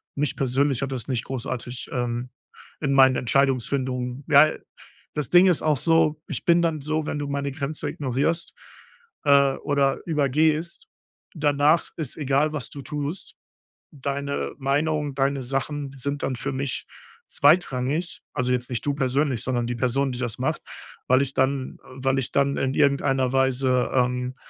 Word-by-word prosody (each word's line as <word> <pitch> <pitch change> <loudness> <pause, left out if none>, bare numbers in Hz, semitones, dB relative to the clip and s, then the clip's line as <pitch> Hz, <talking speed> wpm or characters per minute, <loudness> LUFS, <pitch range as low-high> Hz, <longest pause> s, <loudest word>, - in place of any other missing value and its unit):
Mich 145 -1 -1
persönlich 135 0 +1
hat 140 0 -2
das 120 -4 -4
nicht 125 -4 -2
großartig, 125 -1 -5
ähm, 120 0 -2 0.5
in 140 -3 0
meinen 130 -1 +6
Entscheidungsfindung 130 0 0
ja, 150 +1 +7 0.6
das 150 - -2
Ding 180 +2 +7
ist 180 -4 +3
auch 155 -1 +2
so, 160 +1 +2
ich - - -5
bin 170 0 +5
dann 165 -2 0
so, 155 +2 -1
wenn 150 - -3
du 145 - -3
meine 140 0 -2
Grenze 140 +1 -4
ignorierst, 145 +5 -1 0.7
äh, 140 -1 +5
oder 140 -2 0
übergehst, 155 +2 0 0.5
danach 150 +1 +2
ist 155 -6 -4
egal, 145 +1 +1
was 145 -4 -4
du 140 - -8
tust. 150 +5 -5 0.6
Deine 140 0 -3
Meinung, 145 +1 0
deine 135 0 +1
Sachen 135 +2 -3
sind 140 +2 -3
dann 130 - -1
für - - -4
mich 135 0 -3 0.4
zweitrangig. 150 +1 +1
Also, 125 0 0
jetzt 125 0 -2
nicht 120 +1 -3
du 145 - +1
persönlich, 135 -2 0
sondern 120 -2 -1
die 120 - -2
Person, 130 +2 0
die 125 - -5
das 120 -4 -2
macht, - - -1 0.5
weil 130 +1 +5
ich 135 -1 -3
dann 130 0 0
weil 135 +1 -1
ich 130 - -3
dann 140 0 +2
in 130 0 0
irgendeiner 140 -3 +2
Weise, 130 -1 +2
ähm, 125 0 0
140 Hz, 155 wpm, -24 LUFS, 130-145 Hz, 0.7 s, ja